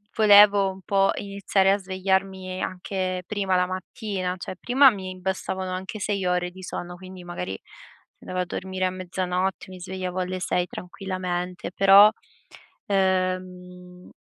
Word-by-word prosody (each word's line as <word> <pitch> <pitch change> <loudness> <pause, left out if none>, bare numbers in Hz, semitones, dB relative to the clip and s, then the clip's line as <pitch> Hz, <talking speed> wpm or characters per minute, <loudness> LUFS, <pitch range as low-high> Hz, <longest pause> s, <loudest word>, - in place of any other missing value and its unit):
volevo 205 -2 +7
un 190 - -12
po' 195 -1 +2
iniziare 195 -1 +1
a 200 - +3
svegliarmi 190 -1 -2
anche 185 0 -3
prima 195 -2 -1
la 180 - +3
mattina, 185 0 -4
cioè 185 - -7
prima 265 +2 +6
mi 185 -3 -7
bastavano 190 0 -3
anche 190 +3 -5
6 200 -1 -1
ore 180 0 0
di 185 - -12
sonno, 175 -1 -6
quindi 185 0 -11
magari 95 - -5
se - - -21
andavo 185 0 -3
a - - -1
dormire 185 +1 -3
a 185 - 0
mezzanotte, 185 0 -2
mi 185 - -10
svegliavo 185 0 -4
alle 185 0 -2
6 180 0 0
tranquillamente, 180 -1 -5
però, 195 +2 +7 0.7
ehm 185 -2 -2
185 Hz, 145 wpm, -25 LUFS, 180-195 Hz, 0.7 s, volevo